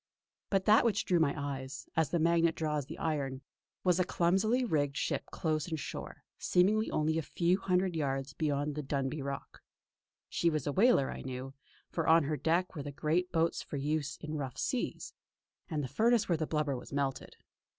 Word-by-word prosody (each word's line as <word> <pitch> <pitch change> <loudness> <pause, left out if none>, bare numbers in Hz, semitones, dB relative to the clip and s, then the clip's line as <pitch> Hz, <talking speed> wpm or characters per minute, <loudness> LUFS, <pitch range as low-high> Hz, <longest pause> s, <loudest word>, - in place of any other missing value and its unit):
But 195 -2 +1
that 215 +1 +6
which 220 -3 +1
drew 175 -2 +3
my 150 -3 +2
eyes, 135 -2 -5
as 160 -1 +2
the 175 - +1
magnet 165 0 +3
draws 150 -3 -1
the 160 - -7
iron, 140 -4 -2 0.4
was 180 -1 +3
a - - +5
clumsily 195 +9 +2
rigged 145 - 0
ship - - -1
close 155 -2 -1
in 160 -2 -2
shore, - - -7 0.2
seemingly 210 +5 +3
only 160 +1 +1
a - - 0
few 175 +4 +1
hundred 185 -2 +1
yards 135 -3 -1
beyond 145 -1 -1
the 150 - -3
Dunbuy 140 +1 -2
Rock. 140 0 -6 0.7
She 170 - +1
was 155 -4 -1
a 145 - 0
whaler 195 - +4
I - - -6
knew, 130 +1 -6 0.4
for 165 - -1
on 165 0 +6
her 150 +2 -1
deck 165 +6 +1
were 150 - -4
the 145 0 -5
great 160 +5 0
boats 165 0 +1
for 145 - -6
use 150 +1 -1
in 155 -1 -5
rough 135 -4 -4
seas, - - -2 0.6
and 150 -2 -1
the - - -2
furnace 225 - +3
where 175 - +2
the 155 -1 -2
blubber 150 -3 0
was 125 - -9
melted. 140 -1 -2
155 Hz, 190 wpm, -32 LUFS, 140-175 Hz, 0.7 s, that